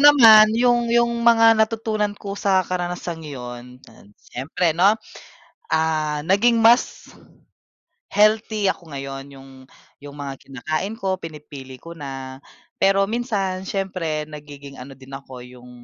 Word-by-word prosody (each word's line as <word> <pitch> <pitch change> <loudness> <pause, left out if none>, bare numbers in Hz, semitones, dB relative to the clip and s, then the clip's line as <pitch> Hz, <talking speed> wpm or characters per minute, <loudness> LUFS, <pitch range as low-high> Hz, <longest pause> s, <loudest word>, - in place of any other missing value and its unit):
naman 230 -7 +8
yung 240 0 +2
yung 235 0 +2
mga 230 -1 +6
natutunan 220 -2 -1
ko 200 -1 -7
sa 195 -2 +1
karanasang 175 -2 -4
yun, 125 -2 -9
ayan, - - -19
siyempre, 160 +6 -2
'no, 195 +7 +3 0.8
ah, 155 -2 0
naging 230 +5 +3
mas 230 +2 +3 1.0
healthy 215 0 +2
ako 170 -4 -3
ngayon 135 -1 -6
yung 135 0 -14 0.5
yung 145 0 -10
mga 140 -1 -5
kinakain 155 - -4
ko 190 -3 -1
pinipili 145 -4 -10
ko 170 - -10
na. 135 -3 -8 0.4
Pero 195 0 +4
minsan 205 -5 -2
siyempre 180 -6 -3
nagiging 145 -2 -11
ano 135 +1 -11
din 135 0 -14
ako 130 -2 -10
yung 125 0 -15
175 Hz, 130 wpm, -21 LUFS, 140-215 Hz, 1.0 s, naman